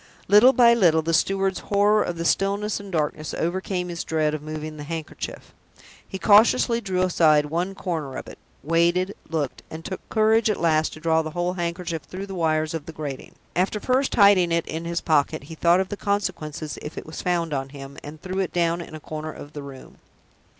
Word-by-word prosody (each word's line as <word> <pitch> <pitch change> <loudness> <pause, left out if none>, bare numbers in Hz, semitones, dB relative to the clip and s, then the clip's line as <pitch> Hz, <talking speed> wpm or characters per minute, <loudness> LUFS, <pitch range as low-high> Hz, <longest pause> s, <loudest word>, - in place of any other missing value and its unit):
Little 210 +6 +7
by 240 -3 +6
little, 170 -8 +4
the 165 +1 -1
steward's 195 +3 +1
horror 205 +1 +3
of 175 - -2
the 165 - -3
stillness 200 +3 +1
and 200 - -10
the 170 - 0
darkness 155 0 -2
overcame 180 +1 -2
his 170 -1 -4
dread 155 -1 0
of 155 - -3
moving 155 0 -6
the 150 - -7
handkerchief. 160 0 -6 0.5
He 190 - -6
cautiously 230 +4 +4
drew 185 -3 0
aside 155 -5 +4
one 175 +6 -2
corner 160 -9 -4
of - - -7
it, - - -11 0.2
waited, 170 +5 +2
looked, 155 -5 -2
and 160 +1 -9
took 190 - -5
courage 220 0 +3
at 210 - 0
last 155 -2 +2
to - - -10
draw 160 0 +2
the 155 - -5
whole 175 +1 0
handkerchief 170 -2 -3
through 185 +7 -7
the 195 - -8
wires 155 -3 0
of 160 -3 -5
the 165 - -7
grating. 145 -4 -7 0.2
After 190 +4 +1
first 260 +4 +1
hiding 200 -4 +5
it 170 0 +1
in 165 +1 -5
his 170 0 -2
pocket, 145 -4 +1
he 155 +3 -10
thought 170 +2 +3
of 190 0 -1
the - - -3
consequences 155 -8 -3
if 150 - -8
it - - -6
was 155 - -7
found 170 -3 0
on 135 -1 -2
him, 140 0 -10
and 150 +1 -9
threw 185 +3 -4
it 190 - -1
down 170 0 +1
in 165 - -9
a - - -7
corner 155 +1 -6
of 145 0 -11
the 145 - -6
room. 140 -2 -12
170 Hz, 215 wpm, -24 LUFS, 155-195 Hz, 0.5 s, Little